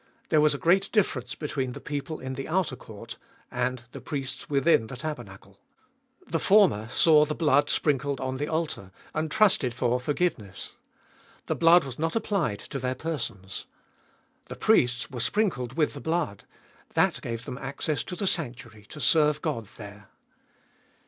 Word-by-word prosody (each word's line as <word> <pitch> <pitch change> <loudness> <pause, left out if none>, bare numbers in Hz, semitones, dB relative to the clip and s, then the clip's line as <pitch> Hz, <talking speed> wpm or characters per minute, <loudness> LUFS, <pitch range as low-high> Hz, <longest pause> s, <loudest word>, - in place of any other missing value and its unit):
There 155 -2 +4
was 150 -1 +4
a - - -3
great 190 +6 +3
difference 130 - 0
between 135 -4 -3
the - - -7
people 150 +2 -4
in 130 0 -5
the 135 0 -5
outer 165 -5 0
court 115 -1 -10 0.3
and 125 -1 -1
the - - -9
priests 135 -4 -5
within 140 -5 +3
the 125 - -8
taber 150 -4 -4
nacle. 95 -3 -15 0.7
The - - -1
former 185 - +4
saw 155 +3 +5
the 150 0 -2
blood 150 -3 +3
sprinkled 140 -2 +1
on 130 0 -3
the 145 +2 -2
altar, 155 - -3 0.2
and 155 +1 -1
trusted 185 - +3
for 125 0 +1
forgiveness; 145 - -2 0.7
the - - 0
blood 170 +1 +6
was 135 -1 -8
not 165 +4 -1
applied 195 - 0
to 135 - -2
their 130 0 -1
persons. 115 - -4 0.8
The - - -8
priests 120 -1 +2
were 125 - -5
sprinkled 135 - 0
with 155 -2 +2
the 140 - -8
blood; 160 - -2 0.5
that - - +2
gave 115 0 -5
them 125 - -6
access 140 +3 -2
to 180 - -5
the 200 - -2
sanctuary 120 - -3
to 150 - -9
serve 150 +2 +3
God 125 -10 -2
there. 105 0 -11
140 Hz, 165 wpm, -27 LUFS, 125-160 Hz, 0.8 s, blood